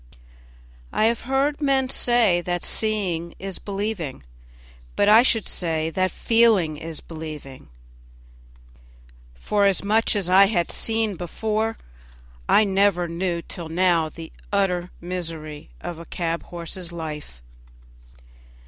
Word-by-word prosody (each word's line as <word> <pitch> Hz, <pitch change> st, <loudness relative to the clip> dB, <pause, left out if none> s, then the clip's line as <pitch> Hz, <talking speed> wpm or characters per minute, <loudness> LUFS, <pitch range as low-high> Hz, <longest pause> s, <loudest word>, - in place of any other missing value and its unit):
I 215 Hz, -, +2 dB
have 230 Hz, 0 st, +1 dB
heard 280 Hz, +3 st, +1 dB
men 270 Hz, -2 st, +2 dB
say 235 Hz, -9 st, +3 dB
that 175 Hz, 0 st, -3 dB
seeing 185 Hz, -6 st, 0 dB
is 195 Hz, -1 st, -5 dB
believing; 195 Hz, -, -4 dB, 0.7 s
but 205 Hz, -, +2 dB
I 215 Hz, +2 st, +8 dB
should 230 Hz, -4 st, +2 dB
say 160 Hz, -2 st, -1 dB
that 185 Hz, +3 st, +1 dB
feeling 220 Hz, -7 st, +3 dB
is 160 Hz, 0 st, -7 dB
believing; 155 Hz, -5 st, -9 dB, 1.7 s
for 200 Hz, -, +2 dB
much 220 Hz, +2 st, +2 dB
as 200 Hz, -4 st, 0 dB
I 190 Hz, +2 st, +7 dB
had 175 Hz, -5 st, 0 dB
seen 220 Hz, -4 st, 0 dB
before, 220 Hz, +5 st, -2 dB, 0.7 s
I 215 Hz, -, +6 dB
never 195 Hz, -3 st, +2 dB
knew 170 Hz, 0 st, -2 dB
till 170 Hz, -2 st, -6 dB
now 170 Hz, -2 st, +2 dB
the 160 Hz, +1 st, -10 dB, 0.2 s
utter 180 Hz, -3 st, +1 dB
misery 165 Hz, -, -5 dB
of 170 Hz, -2 st, -6 dB
a 170 Hz, -, -9 dB
cab 170 Hz, -1 st, -3 dB
horse's 175 Hz, +1 st, -7 dB
life. 150 Hz, -, -7 dB
180 Hz, 120 wpm, -23 LUFS, 165-215 Hz, 1.7 s, I